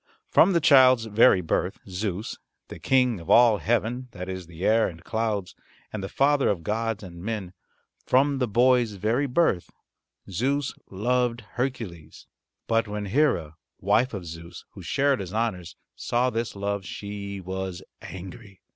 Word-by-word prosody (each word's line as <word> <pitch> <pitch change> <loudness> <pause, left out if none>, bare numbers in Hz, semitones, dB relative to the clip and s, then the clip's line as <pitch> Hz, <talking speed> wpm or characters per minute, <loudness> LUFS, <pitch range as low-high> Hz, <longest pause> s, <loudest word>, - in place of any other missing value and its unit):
From 190 +3 +5
the 170 - +4
child's 130 -6 +6
very 110 -2 +5
birth 90 +3 -1
Zeus, 95 +2 -4 0.3
the - - -9
King 125 -5 +2
of 85 - -11
all 115 -4 +6
heaven 120 +3 -1
that 90 +1 -7
is 95 -2 -6
the 85 +2 -6
air 110 +1 +4
and 80 -2 -10
clouds, 110 -4 -2 0.4
and 110 - -4
the 95 - -4
father 140 0 +2
of 90 -5 -1
gods 110 +2 -2
and 85 -2 -10
men 100 -3 -4 0.5
from 140 +1 +3
the 125 - +1
boy's 120 0 +3
very 110 +8 0
birth 125 - +1 0.6
Zeus 130 +9 -1 0.2
loved 120 +4 0
Hercules. 110 - -5 0.4
But 115 -1 +1
when 105 0 -4
Hera, 95 - +1 0.2
wife 125 0 +2
of 95 -3 -6
Zeus, 85 +1 -10
who - - -11
shared 140 -2 +1
his 95 +1 -6
honours, 95 -8 -2 0.2
saw 125 +1 0
this 115 -1 -3
love 100 0 -2
she 100 0 -6
was 95 -1 -5 0.2
angry. 95 +2 -10
110 Hz, 155 wpm, -25 LUFS, 95-125 Hz, 0.6 s, child's